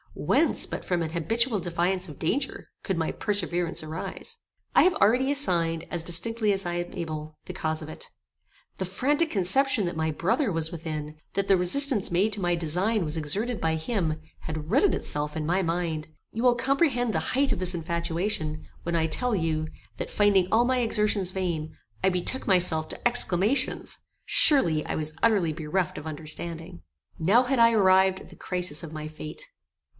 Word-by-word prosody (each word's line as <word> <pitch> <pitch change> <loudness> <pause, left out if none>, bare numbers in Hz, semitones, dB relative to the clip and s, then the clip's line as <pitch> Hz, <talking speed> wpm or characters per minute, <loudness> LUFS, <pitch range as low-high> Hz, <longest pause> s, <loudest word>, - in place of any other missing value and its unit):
Whence, - - +1
but - - -6
from 175 -2 -1
an 160 - -4
habitual 225 +7 0
defiance 175 +1 -1
of 150 - -11
danger, 270 - -2
could 190 - -2
my 160 -1 -1
perseverance 175 -4 -1
arise? 155 +1 -6 0.4
I - - +7
have 365 - +3
already 250 +6 +3
assigned, 170 - +2
as 170 -2 -1
distinctly 210 +6 +1
as 195 -1 +2
I 175 - -2
am 175 0 -3
able, 155 -2 -6
the 185 - -7
cause 160 -3 -3
of 155 - -8
it. 155 - -7 0.7
The 190 - -2
frantic 290 - 0
conception 210 +4 +3
that 175 - -3
my 160 0 -1
brother 195 - 0
was 165 -1 0
within, 155 -2 -6 0.2
that 195 0 -1
the 195 - +5
resistance 210 +5 +4
made 195 +5 +1
to 200 - -1
my 175 -1 +1
design 180 +5 0
was 150 +1 -3
exerted 200 +10 -2
by 160 0 +1
him, 160 -2 -2 0.2
had 155 0 -6
rooted 315 - +3
itself 150 +1 -3
in 155 - -3
my 180 +4 +1
mind. 165 -3 -2 0.2
You 225 - -4
will 250 -1 +5
comprehend 250 -2 +1
the - - +1 0.2
height 280 0 +2
of - - -1
this 185 -1 +2
infatuation, 170 -1 -2 0.2
when 170 0 -2
I 160 -1 +2
tell 240 +8 -1
you, 160 -3 -1 0.3
that, - - -4
finding 200 -3 +3
all 235 +2 +4
my 255 0 +1
exertions 210 -5 +1
vain, 170 -5 -3 0.3
I 190 - +4
betook 185 +8 -3
myself 175 -4 +2
to - - -1
exclamations. 225 0 +1 0.3
Surely 170 - +4
I - - -3
was 155 0 -2
utterly 200 -8 +2
bereft 165 +3 -2
of 150 - -9
understanding. 160 - -6 0.4
Now 200 +10 +4
had 255 0 0
I 230 0 +6
arrived 190 -3 +4
at - - -14
the - - -13
crisis 180 -3 0
of 160 - -8
my 155 -1 -6
fate. 155 - -8
180 Hz, 180 wpm, -26 LUFS, 160-215 Hz, 0.7 s, I